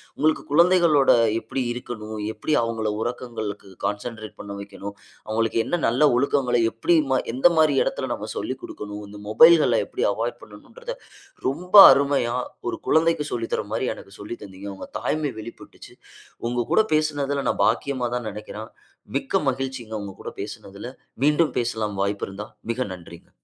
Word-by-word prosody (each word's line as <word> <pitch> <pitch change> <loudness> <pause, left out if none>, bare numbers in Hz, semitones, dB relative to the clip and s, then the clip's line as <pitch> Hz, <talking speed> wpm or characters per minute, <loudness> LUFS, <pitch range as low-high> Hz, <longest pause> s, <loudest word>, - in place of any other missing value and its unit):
உங்களுக்கு 155 +2 +1
குழந்தைகளோட 170 -3 +5 0.3
எப்டி 115 +4 -3
இருக்கணும்? 110 -3 -7 0.2
எப்டி 155 - -2
அவங்கள 110 -2 -1
உறக்கங்களுக்கு 115 -5 -5 0.2
கான்சன்ட்ரேட் 110 +1 -4
பண்ண 100 -1 -7
வைக்கணும்? 100 0 -8 0.3
அவங்களுக்கு 115 +1 0
என்ன 175 - -1
நல்ல 130 +6 +4
ஒழுக்கங்கள, 125 -1 +1 0.2
எப்டி 165 +9 +2 0.2
மா 130 - +3 0.2
எந்த 135 - +6
மாதிரி 155 -3 +4
எடத்தில - - -3
நம்ம - - -6
சொல்லிக் - - -4
கொடுக்கணும்? 105 0 -7
இந்த 105 - -10
மொபைல்கள 160 +8 +6
எப்டி - - -2
அவாய்ட் - - -3
பண்ணனும்ன்கிறத - - -9 0.5
ரொம்ப 180 +8 -3 0.2
அருமையா 140 -4 +1 0.3
1 355 - -3
கொழந்தைக்கு 160 -1 +3
சொல்லி 115 -1 -3
தர்ற - - -1
மாதிரி 130 - 0
எனக்கு 100 - -13
சொல்லி 105 +3 -6
தந்தீங்க. 100 0 -9
உங்க - - -9
தாய்மை 150 -5 -1
வெளிப்பட்டுச்சு. 115 +2 -11 0.5
உங்கள் 120 -1 -2
கூட 220 - +5
பேசுனதுல 145 -2 0
நான் - - +1
பாக்கியமா 130 -3 0
தான் 120 -2 -3
நெனைக்கிறேன். 105 +1 -8 0.4
மிக்க - - +1
மகிழ்ச்சிங்க 130 -3 -3
உங்க 100 -1 -6
கூட - - -6
பேசினதில. 100 +4 -7 0.4
மீண்டும் 150 +2 +3
பேசலாம் 110 -4 -2
வாய்ப்பு 100 +1 -1
இருந்தா. 100 +2 -7 0.2
மிக 125 +2 -2
நன்றிங்க. 85 -2 -13
120 Hz, 150 wpm, -24 LUFS, 105-145 Hz, 0.5 s, எந்த